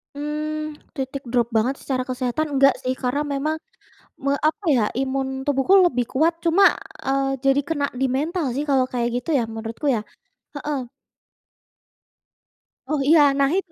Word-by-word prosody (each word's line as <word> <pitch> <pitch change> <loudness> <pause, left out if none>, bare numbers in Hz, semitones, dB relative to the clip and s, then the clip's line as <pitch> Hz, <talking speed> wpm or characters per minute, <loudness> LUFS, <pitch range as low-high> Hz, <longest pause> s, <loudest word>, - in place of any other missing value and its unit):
Mmm, 305 +1 -4 0.2
titik 270 -1 -5
drop 235 -1 0
banget 230 +5 +1
secara 255 -2 -3
kesehatan 255 +4 -2
enggak 275 0 +6
sih, 255 0 -2
karena 260 +3 -1
memang 300 +3 -1 0.6
me 275 +1 0
apa 345 +7 0
ya, 255 -9 +4
imun 265 0 -2
tubuhku 285 +8 +4
lebih 250 -7 -1
kuat 330 +5 +1
cuma, 355 +3 +5 0.3
eee, 270 0 0
jadi 275 +1 +4
kena 290 -1 -1
di 265 +2 0
mental 300 +2 -1
sih 280 +5 -2
kalau 270 -3 +3
kayak 240 -1 -1
gitu 330 - -5
ya 230 - 0
menurutku 225 +5 -6
ya. 215 - -1 0.5
Heeh. 285 -3 -3 2.0
Oh, 305 -1 0
iya. 315 -1 +7 0.2
Nah, 275 0 +4
itu. 375 -4 -3
275 Hz, 155 wpm, -22 LUFS, 255-305 Hz, 2.0 s, iya